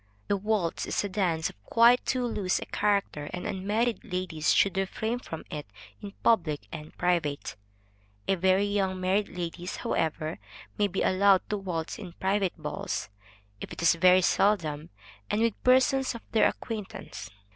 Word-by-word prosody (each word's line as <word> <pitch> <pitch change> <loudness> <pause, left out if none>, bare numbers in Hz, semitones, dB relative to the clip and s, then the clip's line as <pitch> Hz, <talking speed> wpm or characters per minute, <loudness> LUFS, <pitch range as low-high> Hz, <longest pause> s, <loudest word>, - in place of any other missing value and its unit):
The - - +3
waltz 200 -4 -1
is - - 0
a 205 - -3
dance 175 -5 0
of 100 - -30
quite 235 - +5
too 255 -1 +1
loose 200 -6 0
a - - -4
character, 200 -8 0
and 180 - -5
unmarried 210 +5 -1
ladies 180 -6 -1
should 200 - +3
refrain 220 +5 -1
from 160 -9 -8
it 150 -1 -5 0.3
in 200 -1 -8
public 165 -10 +2
and 150 0 -9
private; 170 -5 0 0.7
very 190 +1 +3
young 195 -2 0
married 190 +3 +1
ladies, 175 +1 -5
however, 160 0 -2 0.4
may 205 - +2
be 195 0 -2
allowed 195 0 +4
to 210 - +1
waltz 175 -5 -4
in 185 -5 -8
private 190 0 0
balls, 165 - -4 0.5
if - - -8
it - - -6
is 170 - +6
very 180 +2 +5
seldom, 165 -7 +1 0.4
and 210 - +1
with 230 -2 0
persons 260 0 +3
of 230 - -7
their 220 - +5
acquaintance. 200 - -6
190 Hz, 155 wpm, -28 LUFS, 170-210 Hz, 0.7 s, is